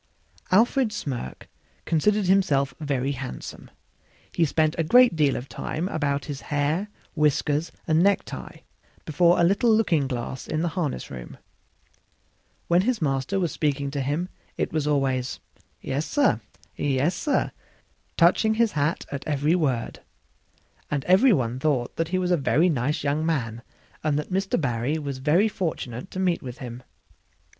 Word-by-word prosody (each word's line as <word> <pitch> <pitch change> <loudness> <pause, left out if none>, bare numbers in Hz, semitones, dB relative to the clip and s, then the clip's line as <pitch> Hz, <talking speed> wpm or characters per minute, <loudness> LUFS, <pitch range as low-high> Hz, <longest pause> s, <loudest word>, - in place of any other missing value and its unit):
Alfred 230 +4 +3
Smirk 135 - -5 0.4
considered 205 +5 +2
himself 175 -8 +2
very 140 -3 -1
handsome; 135 -2 -7 0.6
he 170 - +2
spent 155 +1 +1
a - - +3
great 245 +5 +6
deal 145 -4 +2
of 125 - -5
time 165 +5 -4
about 145 -4 -1
his 145 -3 -6
hair, 150 +7 -1 0.3
whiskers 150 +1 +1
and 160 +1 +3
necktie, 200 +2 -1 0.4
before 170 +3 +3
a - - +4
little 200 +7 +3
looking 180 -11 +2
glass 125 0 -5
in 155 +1 -1
the 175 - +1
harness 160 -7 -3
room. 60 -2 -8 1.3
When 175 +1 +4
his 240 +3 0
master 140 +5 0
was 175 -4 0
speaking 140 -2 -1
to 140 -1 -2
him 150 +7 -1 0.3
it - - -2
was 155 -2 0
always, 135 -5 0 0.4
"Yes, 140 +4 -2
sir; 275 - +2 0.3
yes, 145 +4 +1
sir" 280 - 0 0.7
touching 200 +6 +4
his 230 -1 +2
hat 150 +2 -1
at 140 -1 -5
every 150 +1 +1
word; 135 -10 -1 0.9
and 140 -3 -2
every 195 +9 +5
one 125 - 0
thought 145 +2 0
he 185 - -1
was 180 -1 0
a 175 - +4
very 160 +4 +3
nice 145 -1 -1
young 145 +2 0
man 120 -8 -1 0.4
and 150 -2 +1
that 150 - -4
Mr. 195 -1 0
Barry 125 +1 -1
was 140 -4 -4
very 160 +10 +3
fortunate 165 - -4
to 185 - -6
meet 180 -2 +1
with 125 -1 -7
him. 125 -2 -7
150 Hz, 150 wpm, -25 LUFS, 135-180 Hz, 1.3 s, great